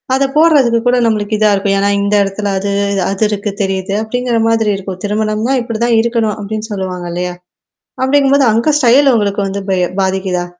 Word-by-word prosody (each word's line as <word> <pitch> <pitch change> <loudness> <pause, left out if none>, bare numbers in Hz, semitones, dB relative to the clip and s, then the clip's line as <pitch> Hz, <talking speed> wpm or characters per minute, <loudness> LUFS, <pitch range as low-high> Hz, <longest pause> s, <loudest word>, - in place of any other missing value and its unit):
அத 270 - +1
போடுறதுக்கு 285 -8 +4
கூட 250 0 +3
நம்மளுக்கு 215 -1 0
இதா 215 0 +3
இருக்கும். 195 0 0
ஏன்னா 200 +1 +1
இந்த 200 +1 -1
இடத்துல 200 +1 -3
அது 200 +1 -3 0.4
அது 195 +2 -2
இருக்கு 205 0 -3
தெரியுது. 190 0 -3
அப்டிங்கிற 245 +1 -2
மாதிரி 225 -1 +1
இருக்கும். 190 -1 -7
திருமணம்னா 215 +4 -1
இப்டிதான் 235 0 0
இருக்கணும் 230 -2 -1
அப்டின்னு 215 +2 -5
சொல்லுவாங்க 185 -3 -4
இல்லையா? 180 +1 -3 0.7
அப்டிங்கும்போது 275 0 +3
அங்க 235 +7 +1
ஸ்டைல் 265 +1 +4
உங்களுக்கு 205 -2 0
வந்து 200 +1 -4
பய 180 -1 +1 0.2
பாதிக்குதா? 190 -2 -1
215 Hz, 165 wpm, -14 LUFS, 195-235 Hz, 0.7 s, போடுறதுக்கு